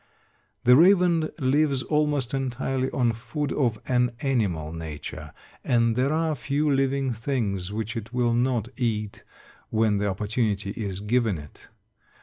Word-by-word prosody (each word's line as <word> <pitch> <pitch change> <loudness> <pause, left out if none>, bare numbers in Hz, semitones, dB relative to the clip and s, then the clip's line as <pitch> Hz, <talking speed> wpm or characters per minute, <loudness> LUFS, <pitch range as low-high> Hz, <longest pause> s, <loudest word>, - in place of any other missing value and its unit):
The 125 +1 +7
raven 175 -1 +5
lives 140 -1 +2
almost 150 -4 0
entirely 130 0 -1
on 120 -3 +1
food 125 +6 -4
of 120 -7 0
an 125 -1 +1
animal 95 - 0
nature, 75 -2 -7 0.3
and 115 -2 +2
there 130 +3 +1
are 160 0 +1
few 145 +2 0
living 135 -1 +1
things 110 -6 -2
which 110 +1 -4
it 115 0 -6
will 120 -1 +1
not 120 -2 +1
eat 110 -4 -2 0.5
when 110 -2 +2
the 105 - 0
opportunity 105 0 -1
is 100 -3 -4
given 110 -2 +1
it. 75 -1 -13
120 Hz, 135 wpm, -25 LUFS, 105-135 Hz, 0.5 s, The